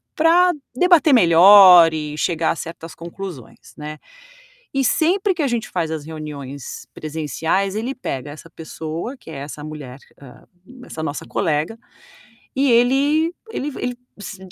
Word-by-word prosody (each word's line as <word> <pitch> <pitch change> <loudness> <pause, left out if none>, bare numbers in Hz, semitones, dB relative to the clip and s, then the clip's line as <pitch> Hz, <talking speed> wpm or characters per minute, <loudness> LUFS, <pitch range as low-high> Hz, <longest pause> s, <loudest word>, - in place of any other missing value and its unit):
pra 345 +3 +4 0.2
debater 335 -1 +4
melhor 180 -3 +8
e 150 -1 -5
chegar 165 0 0
a - - -2
certas 165 0 -9
conclusões, 170 - -10
né. 150 0 -8 0.7
E 270 - +1
sempre 375 +9 +2
que 335 - -2
a - - +1
gente 240 -3 -2
faz 165 -3 -2
as 155 -2 -4
reuniões 145 -4 -8
presenciais, 160 +5 -2
ele 235 +5 -3
pega 140 - -5
essa 155 +2 -12
pessoa, 160 - -7
que 165 - -15
é - - -8
essa 145 +2 -8
mulher, 150 -4 -9 0.2
hã, 130 -3 -15 0.4
essa 160 - -7
nossa 145 -1 -4
colega, 160 +4 -2 0.8
e 275 -1 +2
ele 280 +7 +2 0.2
ele 295 -9 -4
v - - -8
ele 245 0 -3 0.2
diz 205 -1 -8
170 Hz, 150 wpm, -20 LUFS, 155-250 Hz, 0.8 s, melhor